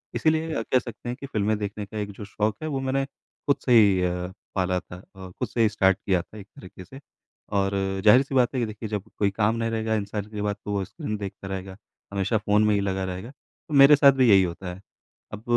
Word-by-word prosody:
इसीलिए 160 -5 0
कह 130 - +2
सकते 120 0 -8
हैं 120 - -3
कि - - -7
फ़िल्में 110 -4 0
देखने 105 0 -4
का 105 +2 -9
एक 105 -1 -4
जो 100 +1 -9
शौक 105 +1 -1
है - - -2
वो 135 -3 -2
मैंने 135 +1 0
खुद 140 +1 -4
से 125 - +3
ही 100 -5 +6
अ, 90 0 -2 0.2
पाला 90 -1 +1
था 90 - -11 0.2
अ, 95 -1 -9
खुद - - -1
से 120 - -2
ही 110 - +4
स्टार्ट 95 -2 +2
किया 95 -3 +2
था 105 - -15
एक 100 -1 -11
तरीके 95 0 -12
से। 135 +9 -12 0.6
और 95 0 +1 0.3
जाहिर-सी 130 +6 +5
बात 125 -1 +3
है - - 0
कि 120 - +1
देखिए 110 0 -7
जब 105 -3 -3 0.2
कोई 100 - +3
काम 105 +3 +1
नहीं 115 0 -1
रहेगा 110 0 -1
इंसान 105 -1 -3
के 105 -1 -5
बाद 105 0 -1
तो 105 - -3
वो 100 -1 0
स्क्रीन 105 - -5
देखता 100 -1 -7
रहेगा, 95 0 -6 0.4
हमेशा 100 +3 +1
फ़ोन 105 0 +2
में 105 - +3
ही 100 - +1
लगा 95 -1 -1
रहेगा, 95 +5 -6
तो 150 +2 -15
मेरे 140 +1 +8
साथ 140 -1 +7
भी 130 -2 +3
यही 95 -2 +7
होता 90 +1 -5
है। 95 - -12 0.5
अब 105 +1 -7
105 Hz, 245 wpm, -25 LUFS, 95-120 Hz, 0.6 s, मेरे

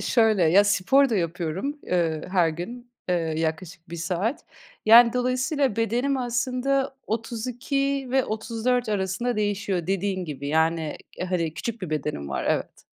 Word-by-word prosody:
şöyle, 220 -5 +3
ya 190 +6 +6
spor 260 +8 +4
da 225 - 0
yapıyorum, 180 - -2
ııı, 165 -3 +1
her 175 -3 +4
gün, 240 +10 -7 0.2
eee, 180 - +2 0.2
yaklaşık 165 +2 -3
1 170 - -5
saat. 180 - -2 0.4
Yani, 235 +1 +8
dolayısıyla 255 0 0
bedenim 245 +5 +1
aslında 255 +2 0
32 250 +5 -2
ve 265 -1 +3
34 230 +2 -1
arasında 205 +4 -1
değişiyor 200 -4 -1
dediğin 195 -1 -1
gibi. 140 -2 -5
Yani, 160 0 +1 0.3
hani, 165 -4 -1
küçük 230 -3 -5
bir 170 - -4
bedenim 150 - -3
var, 70 - -3
evet. - - -2
210 Hz, 140 wpm, -25 LUFS, 170-245 Hz, 0.4 s, Yani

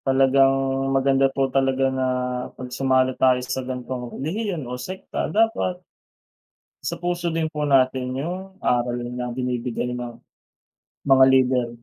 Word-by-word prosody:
Talagang 135 0 +4 0.4
maganda 135 0 +3
po 135 0 0
talaga 135 0 +2
na 130 0 0 0.5
pag 125 -1 -8
sumali 130 0 +2
tayo 130 -1 +5
sa 130 +1 -2
gantong 125 -1 -5
relihiyon 175 - -3
o 125 - -6
sekta 125 +10 -4
dapat 225 -4 +1 1.1
isapuso 175 0 -2
din 165 -1 0
po 150 -1 -4
natin 130 -2 +2
yung 185 +6 -5
aral 120 -4 0 0.2
na 125 0 -3
binibigay 125 0 -3
ng 120 -1 -6 0.9
mga 135 -1 +6
leader. 130 -2 +3
130 Hz, 125 wpm, -23 LUFS, 125-150 Hz, 1.1 s, mga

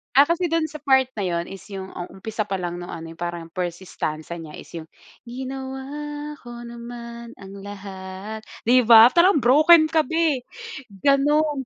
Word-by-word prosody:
Ah, 280 +3 +7
kasi 340 +1 +1
do'n 330 -1 0
sa 305 - -8
part 265 -2 +3
na 200 - -1
'yun 170 -1 -1
is 195 -1 -10
yung, 190 0 -6
um, 175 - -6 0.2
umpisa 220 0 -3
pa 200 - -5
lang 175 0 -3
nung 175 0 -7
ano, 165 0 -7
'yung 165 - -12
parang 175 -1 -5
first 175 0 -4
stanza 160 -2 -5
niya 160 -2 -9
is - - -11
'yung, 160 - -7 0.4
"Ginawa 270 +4 -6
ko 240 -3 -11
naman 235 0 -9
ang 195 +1 -11
lahat", 195 +1 -8 0.2
'di 245 +1 +4
ba? 230 0 +9
Parang 340 0 +4
broken 310 +6 +6
ka 315 0 +2
be, 315 -4 0 0.6
gano'n 290 0 +2
235 Hz, 175 wpm, -23 LUFS, 190-290 Hz, 0.6 s, ba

